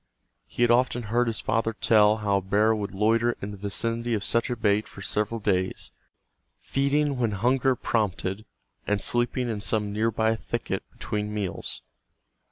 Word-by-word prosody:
He 120 Hz, -, -1 dB
had 120 Hz, -, +4 dB
often 120 Hz, 0 st, +2 dB
heard 120 Hz, 0 st, +3 dB
his 115 Hz, -3 st, -2 dB
father 115 Hz, 0 st, 0 dB
tell 110 Hz, -1 st, +4 dB
how 100 Hz, -1 st, +3 dB
a -, -, -1 dB
bear 105 Hz, +4 st, +3 dB
would 105 Hz, -2 st, -3 dB
loiter 115 Hz, +4 st, +2 dB
in 100 Hz, -, -5 dB
the 100 Hz, -, -8 dB
vicinity 115 Hz, +4 st, -2 dB
of 105 Hz, -, -3 dB
such 115 Hz, +4 st, +1 dB
a 125 Hz, -, -1 dB
bait 105 Hz, -2 st, +1 dB
for 100 Hz, -, -11 dB
several 105 Hz, +3 st, -1 dB
days, 95 Hz, -3 st, -1 dB, 0.7 s
feeding 140 Hz, +1 st, 0 dB
when 115 Hz, -4 st, +1 dB
hunger 130 Hz, +5 st, +2 dB
prompted 105 Hz, -3 st, -1 dB, 0.4 s
and 105 Hz, 0 st, +1 dB
sleeping 120 Hz, +2 st, 0 dB
in 110 Hz, -3 st, -3 dB
some 105 Hz, -1 st, -1 dB
nearby 110 Hz, +1 st, +1 dB
thicket -, -, -3 dB
between 105 Hz, 0 st, -4 dB
meals. 105 Hz, -4 st, -4 dB
110 Hz, 165 wpm, -26 LUFS, 105-120 Hz, 0.7 s, had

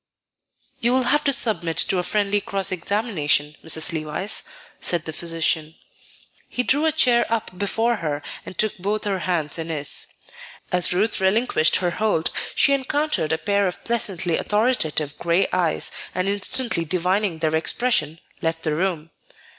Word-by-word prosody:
"You 240 Hz, +1 st, +2 dB
will 260 Hz, 0 st, +3 dB
have 295 Hz, +5 st, +2 dB
to 280 Hz, -, +4 dB
submit 175 Hz, -11 st, +2 dB
to 185 Hz, -, +2 dB
a -, -, -1 dB
friendly 205 Hz, +1 st, +1 dB
cross 195 Hz, -2 st, 0 dB
examination, 170 Hz, -6 st, 0 dB
Mrs. 160 Hz, +2 st, +2 dB
Levice," 160 Hz, +6 st, -1 dB, 0.4 s
said 170 Hz, -3 st, 0 dB
the 160 Hz, -, -5 dB
physician. 165 Hz, -1 st, -1 dB, 0.7 s
He 250 Hz, -, -1 dB
drew 290 Hz, +5 st, +2 dB
a -, -, +4 dB
chair 250 Hz, -6 st, +3 dB
up 220 Hz, -5 st, -2 dB
before 225 Hz, +4 st, 0 dB
her 150 Hz, -5 st, -3 dB, 0.2 s
and 185 Hz, -, -10 dB
took 215 Hz, -1 st, +1 dB
both 205 Hz, +3 st, -2 dB
her 195 Hz, -2 st, -1 dB
hands 170 Hz, -3 st, -2 dB
in 165 Hz, 0 st, -5 dB
his. 145 Hz, -3 st, -4 dB, 0.6 s
As 180 Hz, -1 st, +3 dB
Ruth 195 Hz, +3 st, +2 dB
relinquished 190 Hz, -5 st, +2 dB
her 180 Hz, -2 st, +1 dB
hold, 205 Hz, -5 st, 0 dB, 0.2 s
she 280 Hz, -, +4 dB
encountered 275 Hz, -, 0 dB
a 160 Hz, -, +2 dB
pair 200 Hz, +4 st, +1 dB
of 180 Hz, -, -5 dB
pleasantly 195 Hz, -8 st, -1 dB
authoritative 160 Hz, -, 0 dB
gray 170 Hz, +3 st, +2 dB
eyes, 175 Hz, -3 st, +1 dB, 0.2 s
and 185 Hz, +1 st, 0 dB
instantly 205 Hz, 0 st, 0 dB
divining 180 Hz, +2 st, 0 dB
their 160 Hz, -1 st, 0 dB
expression, 160 Hz, -3 st, +1 dB, 0.2 s
left 165 Hz, 0 st, -1 dB
the 155 Hz, -, 0 dB
room. 165 Hz, -1 st, -2 dB
185 Hz, 155 wpm, -22 LUFS, 160-215 Hz, 0.7 s, to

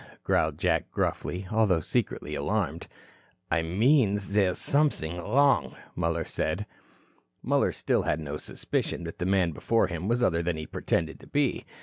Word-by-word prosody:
growled -, -, +1 dB
Jack -, -, +1 dB
gruffly, 90 Hz, +2 st, -2 dB
although 105 Hz, -6 st, +3 dB
secretly 75 Hz, -1 st, -2 dB
alarmed. 85 Hz, +1 st, -2 dB, 0.6 s
"I 85 Hz, -1 st, +3 dB
mean 105 Hz, -, +3 dB
there's 100 Hz, -2 st, +1 dB
something 140 Hz, -, +1 dB
wrong," 135 Hz, +11 st, +2 dB, 0.2 s
Muller 85 Hz, -1 st, -1 dB
said. -, -, -2 dB, 0.8 s
Muller -, -, +2 dB
still -, -, 0 dB
had 75 Hz, -, 0 dB
no 75 Hz, -1 st, -4 dB
suspicion 85 Hz, -, -3 dB
that 85 Hz, -1 st, -7 dB
the 90 Hz, -, -1 dB
man 95 Hz, -3 st, +2 dB
before 115 Hz, +9 st, +1 dB
him 90 Hz, +1 st, -4 dB
was 120 Hz, +2 st, +1 dB
other 85 Hz, -6 st, +2 dB
than 85 Hz, -1 st, -1 dB
he 80 Hz, -, -5 dB
pretended 80 Hz, 0 st, -2 dB
to -, -, -15 dB
be. 145 Hz, -2 st, 0 dB
90 Hz, 150 wpm, -28 LUFS, 80-110 Hz, 0.8 s, although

